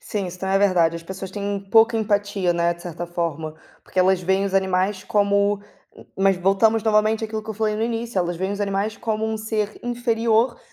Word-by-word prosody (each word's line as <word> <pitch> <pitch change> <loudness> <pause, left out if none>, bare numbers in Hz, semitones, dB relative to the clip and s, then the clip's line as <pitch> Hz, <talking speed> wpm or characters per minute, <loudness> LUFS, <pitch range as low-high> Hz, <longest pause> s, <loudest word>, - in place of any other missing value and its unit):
Sim, 200 -3 -3
isso 180 +1 -8
também 190 +1 -1
é - - +4
verdade, 175 -4 +3
as 165 - -9
pessoas 190 +2 -7
têm 200 0 -3
pouca 225 +1 +5
empatia, 205 -4 0
né, 170 0 +1
de 170 - -15
certa 175 0 -6
forma, 160 -2 -3 0.3
porque 185 - -6
elas 185 0 +4
veem 190 +2 +1
os 195 -1 -3
animais 190 +1 +1
como 200 0 +2 0.4
m - - -15
mas 195 -1 +3
voltamos 200 +4 +2
novamente 215 +1 +2
aquilo 220 0 -4
que 220 - -7
eu 220 - -5
falei 215 0 0
no 220 - -2
início, 230 -2 -2
elas 175 -1 -1
veem 190 +3 -2
os 205 - -5
animais 200 +2 -1
como 220 0 -2
um 220 0 -2
ser 215 -1 -3
inferior, 235 0 +1
200 Hz, 215 wpm, -22 LUFS, 185-220 Hz, 0.4 s, pouca